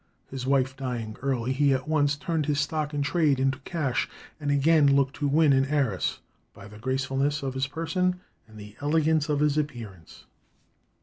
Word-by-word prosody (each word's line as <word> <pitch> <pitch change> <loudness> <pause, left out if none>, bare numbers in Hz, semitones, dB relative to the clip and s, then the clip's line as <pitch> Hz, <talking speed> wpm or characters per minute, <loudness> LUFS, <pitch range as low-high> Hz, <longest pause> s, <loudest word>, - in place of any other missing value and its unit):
His 130 -1 -5
wife 135 -1 +2
dying 120 -5 -4
early, 130 -2 -1
he 140 0 +3
at 130 +2 -4
once 145 -2 +2
turned 160 -1 -2
his 145 -1 +1
stock 150 +1 -1
in 145 -1 -1
trade 145 -2 +2
into 135 0 +1
cash, 140 -3 -2 0.3
and 145 -2 -3
again 145 +1 +4
looked 140 -1 +2
to 145 - 0
win 150 0 +4
an 135 0 +3
heiress, 135 -9 0 0.4
"by 100 - -11
the 105 +1 -13
gracefulness 135 +4 -1
of 135 -1 -2
his 130 0 -1
person 180 +4 -1 0.3
and 110 -1 -15
the 105 0 -11
elegance 155 +1 +1
of 145 -1 +1
his 150 0 +2
appearance." 115 - -7
140 Hz, 180 wpm, -26 LUFS, 130-150 Hz, 0.4 s, again